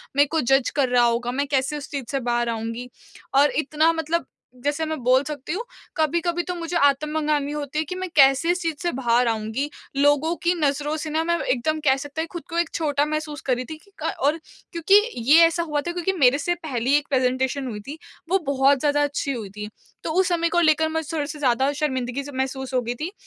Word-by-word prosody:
मेरे 285 +1 +5
को 320 - +1
जज़ 270 +1 +2
कर 275 -3 +2
रहा 245 -1 +4
होगा 240 +1 0
मैं 280 +2 -1
कैसे 275 +1 0
उस 285 - -8
चीज़ 275 -4 -4
से 275 - 0
बाहर 240 -1 0
आऊँगी? 230 +2 -4 0.4
और 280 +2 +5
इतना 310 +2 +2
मतलब 325 -1 -1 0.4
जैसे 290 +2 0
मैं 315 0 -3
बोल 255 +2 +4
सकती 295 +1 -5
हूँ 420 +6 -3 0.3
कभी-कभी 340 +2 0
तो 360 - -4
मुझे 340 0 -2
आत्म 285 0 +2
मंगानी 300 -2 0
होती 295 0 -3
है - - +1
कि 365 - -3
मैं 370 0 -4
कैसे 275 +3 +5
इस 360 0 -2
चीज़ 330 -2 -1
से 345 - +1
बाहर 245 -1 +2
आऊँगी 225 +5 -2 0.3
लोगों 290 +4 +3
की 345 - +3
नज़रों 295 +1 0
से 310 0 -5
ना 315 +1 0
मैं 340 +1 +1
एकदम 260 +5 0
कह 265 -2 +5
सकते 290 +3 -5
हैं 325 - -3
खुद 345 -2 -6
को 335 - -4
एक 340 -1 +1
छोटा 290 -2 +1
महसूस 305 -1 -4
कर 255 -2 +2
रही 255 - -5
थी 315 - -5
की 400 - -24
क - - 0
और 300 +3 +3 0.3
क्योंकि 340 +2 +3 0.4
ये 330 +1 +9
ऐसा 335 +1 -1
हुआ 300 -3 -1
था 345 - -4
क्योंकि 355 +2 -1
मेरे 260 0 +5
से 350 +4 -1
पहली 270 -6 -2
एक 295 - -3
प्रेजेंटेशन 260 0 0
हुई 215 -4 -5
थी 295 - -6 0.3
वो 385 +2 +3
बहुत 275 0 +3
ज़्यादा 290 +1 +2
अच्छी 285 -1 -2
हुई 220 -6 -6
थी 210 +1 -7 0.3
तो - - -2
उस 375 - +3
समय 335 -1 +1
को 345 - +2
लेकर 315 -1 +3
मुझे 320 -1 -3
थोड़े-से 300 0 -3
ज़्यादा 265 0 +2
शर्मिंदगी 260 -2 -1
से 285 - -8
महसूस 265 0 -3
हो 255 - +2
गई 240 +1 -3
थी 335 +4 -3
290 Hz, 230 wpm, -23 LUFS, 260-320 Hz, 0.4 s, ये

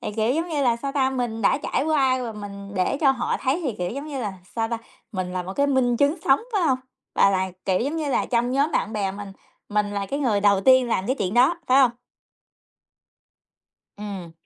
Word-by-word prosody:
Thì, - - -4
kiểu, 220 +3 +2
giống 335 +2 -1
như 295 -3 -1
là, 235 -2 +3
sao 275 +3 -4
ta, 265 -2 +2
mình 240 -4 -3
đã 200 - +3
trải 275 - -1
qua 265 -5 +2
và 230 -2 -4
mình 200 -1 -8
để 185 +8 +1
cho 275 -4 +5
họ 255 -2 -1
thấy 280 +6 0
thì, 255 - 0
kiểu, 180 0 -2
giống 280 +5 -6
như 280 -4 -4
là, 205 -4 -3 0.2
sao 225 0 0
ta, 230 -1 -2 0.3
mình 185 -2 -3
là 180 -1 -2
một 185 +2 -6
cái 280 +4 +1
minh 255 -3 +2
chứng 285 +6 +2
sống, 270 0 +4
phải 400 -4 +1
hông? 260 -5 +2 0.4
Và 200 - +5
là, 190 -1 0
kiểu, 185 -1 +2
giống 285 +6 -2
như 305 -3 -2
là, - - +1
trong 240 0 +1
nhóm 285 +3 +1
bạn 215 - 0
bè 200 -3 -1
mình, 200 -1 -8 0.4
mình 210 -1 0
là 200 -1 -3
cái 280 - -3
người 230 -8 +1
đầu 200 -1 +4
tiên 260 +2 +5
làm 195 -3 0
cái 260 +2 0
chuyện 195 +2 -1
đó, 265 +8 +4
phải 265 +2 +5
hông? 255 -3 +5 2.1
Ừm. 195 -5 -7
240 Hz, 235 wpm, -24 LUFS, 200-275 Hz, 2.1 s, cho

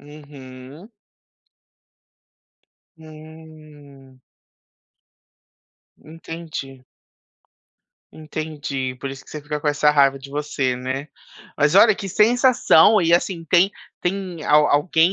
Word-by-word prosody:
Uhum. 145 - -14 2.1
Hum. 155 -4 -16 1.8
Entendi. 155 -5 -9 1.3
Entendi, 150 -4 -6
por 135 - -5
isso 135 0 -11
que - - -17
você 150 -1 -8
fica 150 0 -5
com - - -6
essa 150 0 +2
raiva 140 -2 +3
de 135 +1 -12
você, 140 -3 -2
né. 130 +3 -5 0.5
Mas 150 +3 +1
olha, 215 +2 +6
que 195 - -7
sensação, 220 -3 +4
e 165 - +1
assim 170 0 0
tem 180 +4 +3 0.3
tem 180 -3 -4
al 150 0 +4
alguém 160 +4 +2
150 Hz, 100 wpm, -21 LUFS, 140-165 Hz, 2.1 s, olha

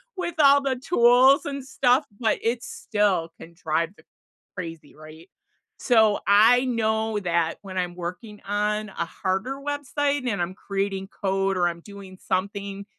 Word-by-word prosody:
with 350 -3 -4
all 280 -1 +6
the 270 -2 -1
tools 255 0 +4
and 280 -2 -5
stuff, 260 +1 +2 0.2
but 220 - +2
it 235 +1 -1
still 200 -7 -1
can 170 +1 -12
drive 165 0 -1
the - - -19 0.5
crazy, 165 -4 -8
right? 155 +3 -14 0.5
So, 220 -4 +3
I 225 +6 +5
know 220 -2 0
that 170 -3 0
when 185 -2 -6
I'm 175 -1 -2
working 180 +5 -7
on 210 +1 -1
a 170 - -4
harder 195 +9 -3
website, 285 -1 -2
and 200 -5 -1
I'm 175 - -3
creating 195 0 -3
code 195 -1 -1
or 175 -1 +2
I'm 170 0 -6
doing 195 -1 -12
something 200 +1 -3
205 Hz, 150 wpm, -24 LUFS, 185-245 Hz, 0.5 s, all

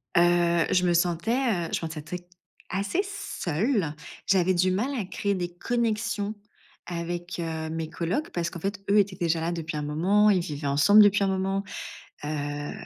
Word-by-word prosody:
Heu, 170 -1 +4
je 180 0 +3
me 175 - +3
sentais, 175 +6 +1
heu, 225 -11 0
je - - +1
sentais 160 -2 -5
très 175 +4 -7 0.4
assez 200 - 0
seule. 200 - -1 0.3
J'avais 185 -1 +4
du 185 +1 +2
mal 210 +8 0
à 220 - -1
créer 200 +2 -1
des 175 -1 -3
connexions 220 -2 -1 0.5
avec 175 0 -4
heu, 160 -1 -3
mes 160 0 -3
colocs 180 - -2
parce 170 -1 -1
qu'en 170 - -8
fait, 200 +2 -2
eux 205 - +5
étaient 195 -2 +1
déjà 165 -3 0
là 165 +1 -1
depuis 160 -2 -4
un - - -2
moment. 180 +8 +3
Ils 195 -3 +4
vivaient 145 -3 -4
ensemble 150 +10 +6
depuis 205 0 +4
un - - +2
moment, 195 +1 0 0.6
heu 145 -1 -3
175 Hz, 175 wpm, -27 LUFS, 165-200 Hz, 0.6 s, ensemble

